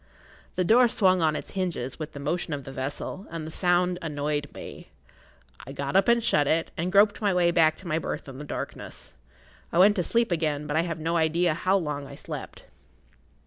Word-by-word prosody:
The 185 - +1
door 240 +5 +6
swung 185 -6 +3
on 155 -1 +2
its - - -6
hinges 175 -10 -3
with 155 -1 -6
the 140 - -7
motion 160 +3 -2
of 140 - -7
the 135 - -8
vessel, 140 +8 -5
and 165 -2 -5
the 160 - -7
sound 180 +1 +1
annoyed 145 -2 -2
me. - - -10 0.8
I 135 - -7
got 140 +3 -4
up 195 0 +4
and 235 -1 +4
shut 145 -9 +3
it, 165 +2 +1
and 175 +3 -2
groped 205 +2 +4
my 205 -2 +2
way 175 -1 +4
back 160 -2 +3
to 185 - -11
my 160 -1 0
berth - - -5
in 135 0 -9
the - - -6
darkness. 145 - -7 0.6
I - - -1
went 200 +3 +6
to 180 - +1
sleep 235 +3 +1
again; 155 -3 0
but 150 - -3
I 160 - +4
have 170 -1 -3
no 165 +2 -1
idea 165 +1 +2
how 185 +4 +2
long 150 -5 -3
I - - -10
slept. - - -8
165 Hz, 215 wpm, -26 LUFS, 150-185 Hz, 0.8 s, door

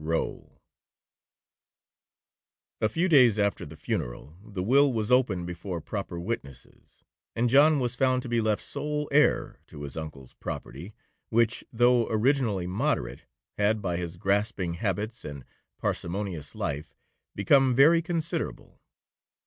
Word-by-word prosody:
ROWE 80 +1 -2 2.3
A 110 - +3
few 170 +10 0
days 125 - +6
after 100 -5 0
the 80 +1 -12
funeral, 65 +3 -4
the 100 -4 -5
will 140 +6 +4
was 110 -1 -2
opened 110 -9 +3
before 90 0 -5
proper 95 0 -5
witnesses, 70 - -8 0.3
and 120 +1 +1
John 145 +2 +6
was 125 -2 -1
found 130 0 +1
to - - -6
be 120 -1 +1
left 110 -1 0
sole 150 0 -3
heir 150 +2 +2
to 75 - -10
his 70 - -7
uncle's 75 -5 -8
property, 90 +10 -7 0.3
which, 115 +1 +1
though 120 0 +3
originally 110 -4 +1
moderate, 90 -9 -2 0.3
had, 105 +1 +2
by 90 -4 -2
his 85 -1 -5
grasping 100 -2 0
habits, 105 +5 -3
and 70 -3 -8 0.3
parsimonious 90 -4 -3
life, 75 +2 -4 0.4
become 130 +6 +4
very 160 +6 +6
considerable. 170 -1 -4
105 Hz, 130 wpm, -27 LUFS, 85-125 Hz, 2.3 s, days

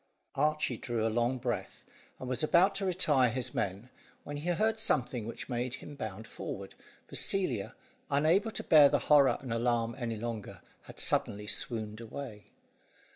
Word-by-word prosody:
Archy 150 -3 +1
drew 115 -1 -2
a 110 - 0
long 120 +2 +1
breath, 125 - -4 0.3
and 130 - -7
was 125 -1 -1
about 180 +5 +4
to 195 0 -2
retire 150 -8 +3
his 125 +1 -2
men, 100 +6 -3 0.3
when 145 - -6
he 155 +5 -3
heard 220 +6 +1
something 125 - 0
which 115 - -7
made 125 0 -2
him 145 - -10
bound 110 -5 -6
forward, - - -7 0.3
for - - -9
Celia, 130 - +1 0.3
unable 160 +10 +3
to - - -4
bear 150 -3 +7
the - - +3 0.2
horror 140 -2 +6
and 125 -4 -4
alarm 115 0 0
any 115 -3 -3
longer 115 -2 -6 0.2
had - - -11
suddenly 105 +1 +1
swooned 110 0 -2
away. 115 -2 -8
125 Hz, 165 wpm, -31 LUFS, 115-150 Hz, 0.3 s, bear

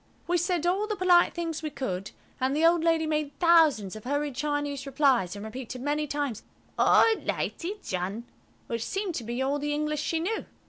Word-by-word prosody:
We 355 - 0
said 350 -1 0
all 385 +4 +1
the 425 - -2
polite 360 -2 +4
things 330 -2 -3
we 310 - -3
could, 195 -9 -4 0.3
and 260 +2 0
the 315 +2 +3
old 335 0 +4
lady 330 -1 +2
made 300 -2 -2
thousands 315 - +4
of 215 - -9
hurried 285 +2 -1
Chinese 290 0 -2
replies, 260 - +2
and 205 +1 -7
repeated 250 +2 -7
many 295 +1 0
times, 285 -6 -2 0.3
"All - - +5
litey, 380 +5 -3
John," 190 +5 -3 0.4
which 230 -1 -3
seemed 390 - -3
to 245 - -4
be 240 +3 -2
all 280 +2 0
the 295 +1 -1
English 300 0 -1
she 325 +1 -1
knew. 405 +7 -2
295 Hz, 190 wpm, -27 LUFS, 255-330 Hz, 0.4 s, All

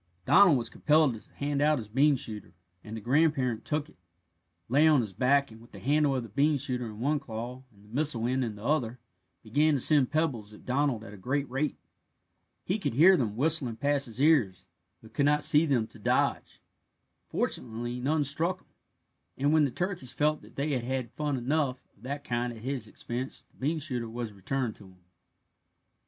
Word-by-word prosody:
Donald 180 -8 +6
was 115 -2 -4
compelled 150 -3 +3
to 110 - -12
hand 145 0 -2
out 150 +1 +4
his 110 -5 -6
bean 140 +7 +3
shooter, 110 -6 -6 0.3
and 110 +1 -7
the - - -7
grandparent 130 -2 +1
took 150 -1 -2
it, 160 - -22 0.7
lay 145 +6 +4
on 150 -4 +5
his 105 -4 -5
back, 135 +5 +2
and 110 +1 -13
with 120 - -18
the - - -9
handle 145 +1 +2
of 130 - -1
the 115 - -10
bean 145 +7 +2
shooter 125 -3 -2
in 105 -1 -9
one 145 +5 +1
claw 120 0 -6
and 100 -1 -21
the 105 - -17
missile 140 -5 0
end 130 +2 +1
in 110 -3 -4
the 105 - -12
other 125 -4 0 0.5
began 145 +7 +2
to - - 0
send 140 -1 +4
pebbles 130 -9 -1
at - - -15
Donald 130 -3 0
at 105 - -10
a - - -10
great 135 +8 -1
rate. 135 +3 -1 0.9
He 190 +4 -1
could 155 - -2
hear 180 +7 +7
them 115 - -1
whistling 140 -3 0
past 140 +3 0
his 115 +1 -8
ears, 120 - +3 0.4
but 110 0 -15
could 140 - +2
not 150 0 +2
see 155 0 +5
them 125 -6 +2
to - - -13
dodge. - - 0 0.7
Fortunately 120 +1 -3
none 150 +4 +1
struck 165 +7 0
him, - - -31 0.7
and 145 +3 +2
when 155 -2 +5
the - - 0
turkeys 175 -3 -3
felt 150 +4 +1
that - - -17
they 145 +2 -1
had 130 -4 -1
had 130 -1 -3
fun 150 -2 -2
enough 130 +1 0 0.2
of - - -27
that 140 +2 -5
kind 120 -1 -2
at 115 -2 -11
his 130 -4 -3
expense 120 +4 -5
the - - -32
bean 150 +5 0
shooter 125 -6 -3
was 115 -2 -5
returned 115 +4 -2
to 105 - -14
him. 90 -1 -19
130 Hz, 205 wpm, -29 LUFS, 115-150 Hz, 0.9 s, hear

